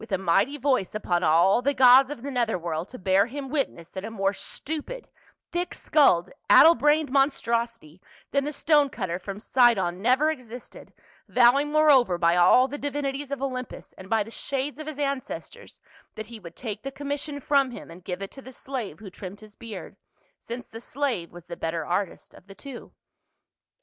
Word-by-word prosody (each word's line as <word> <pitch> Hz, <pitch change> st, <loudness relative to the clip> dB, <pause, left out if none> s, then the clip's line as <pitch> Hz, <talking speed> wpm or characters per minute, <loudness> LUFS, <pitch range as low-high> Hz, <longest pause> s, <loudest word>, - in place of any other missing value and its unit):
a 190 Hz, -, +1 dB
mighty 195 Hz, +10 st, +1 dB
voice 255 Hz, -9 st, 0 dB
upon 175 Hz, -5 st, 0 dB
all 170 Hz, +7 st, +4 dB
the 280 Hz, +3 st, 0 dB
gods 255 Hz, +1 st, +7 dB
of 290 Hz, -5 st, -7 dB
the 280 Hz, -, -4 dB
nether 235 Hz, -5 st, 0 dB
world 170 Hz, +1 st, -4 dB
to 255 Hz, -, -9 dB
bear 190 Hz, +1 st, +2 dB
him 270 Hz, +2 st, -6 dB
witness 255 Hz, -, -3 dB
that 190 Hz, -, -6 dB
a 220 Hz, -, -5 dB
more 195 Hz, -3 st, -1 dB
stupid, 320 Hz, -, -5 dB, 0.4 s
thick 350 Hz, 0 st, -3 dB
skulled, 185 Hz, -, +3 dB, 0.2 s
addle 330 Hz, -, +9 dB
brained 295 Hz, +2 st, +2 dB
monstrosity 235 Hz, -, 0 dB, 0.3 s
than 280 Hz, 0 st, +1 dB
the 295 Hz, -, -3 dB
stone 295 Hz, -1 st, +3 dB
cutter 185 Hz, -8 st, -4 dB
from 195 Hz, +2 st, -7 dB
Sidon 210 Hz, -7 st, +2 dB
never 265 Hz, +7 st, +3 dB
existed, 250 Hz, -5 st, -10 dB, 0.4 s
vowing 260 Hz, +4 st, +4 dB
moreover 280 Hz, -, +4 dB
by 170 Hz, 0 st, +3 dB
all 180 Hz, +9 st, +5 dB
the 290 Hz, +2 st, -7 dB
di 285 Hz, -, -2 dB
vinities 280 Hz, 0 st, -3 dB
of 280 Hz, -1 st, -4 dB
Olympus 255 Hz, -2 st, -5 dB
and 185 Hz, 0 st, -12 dB
by 225 Hz, -2 st, +2 dB
the 225 Hz, -, -12 dB
shades 275 Hz, +3 st, -4 dB
of 310 Hz, -, -7 dB
his 310 Hz, -2 st, -6 dB
ancestors 280 Hz, -2 st, -5 dB, 0.4 s
that 220 Hz, -, -6 dB
he 230 Hz, +1 st, -10 dB
would 170 Hz, -4 st, -12 dB
take 215 Hz, -4 st, -6 dB
the 275 Hz, -, -5 dB
commission 285 Hz, +1 st, -5 dB
from 280 Hz, -1 st, +2 dB
him 240 Hz, -, -10 dB
and 175 Hz, +2 st, -13 dB
give 185 Hz, +1 st, -5 dB
it 195 Hz, -, -7 dB
to 270 Hz, -, -11 dB
the 260 Hz, 0 st, -12 dB
slave 250 Hz, -, -5 dB
who 205 Hz, -3 st, -11 dB
trimmed 195 Hz, +2 st, -9 dB
his 215 Hz, -1 st, -13 dB
beard, 230 Hz, -3 st, -9 dB, 0.4 s
since 240 Hz, +1 st, -8 dB
the 225 Hz, -, -9 dB
slave 245 Hz, -10 st, -3 dB
was 175 Hz, -1 st, -12 dB
the 170 Hz, -1 st, -7 dB
better 165 Hz, -1 st, -3 dB
artist 180 Hz, +2 st, -3 dB
of 185 Hz, -, -18 dB
the 195 Hz, -, -12 dB
two. 260 Hz, +3 st, -10 dB
240 Hz, 190 wpm, -26 LUFS, 190-280 Hz, 0.4 s, addle